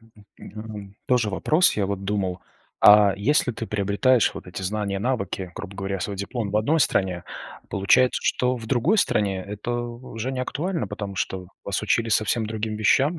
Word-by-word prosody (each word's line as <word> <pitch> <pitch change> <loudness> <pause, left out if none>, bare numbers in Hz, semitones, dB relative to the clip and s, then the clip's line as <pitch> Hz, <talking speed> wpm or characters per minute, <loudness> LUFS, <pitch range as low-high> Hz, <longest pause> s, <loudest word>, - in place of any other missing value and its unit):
м, 110 -2 -21
э, - - -17
м, 105 -2 -9
тоже 125 -4 +2
вопрос. 155 - +3
Я 100 -2 +1
вот 100 -1 -4
думал. 95 -3 -2 0.4
А 105 -1 +8
если 125 +5 +2
ты 115 0 -5
приобретаешь 105 +5 +2
вот - - -9
эти 90 +1 -7
знания, 100 0 -2
навыки, 100 -6 -2
грубо 100 - -8
говоря, 95 -1 -3
свой 100 +2 -3
диплом 100 +2 -3
в 105 - 0
одной 145 +10 +2
стране, 95 -8 +1 0.4
получается, 100 +6 +3
что 125 0 +1
в 115 -2 -8
другой 135 - +2
стране 100 - +1
это 105 +3 -5
уже 120 0 -5
не 130 - -3
актуально. 165 +7 -2
Потому 100 -2 -6
что 95 -1 -3 0.2
вас 100 - -2
учили 115 +2 +1
совсем 110 +1 +1
другим 110 0 -3
вещам. 135 +9 +2
105 Hz, 180 wpm, -24 LUFS, 100-120 Hz, 0.4 s, А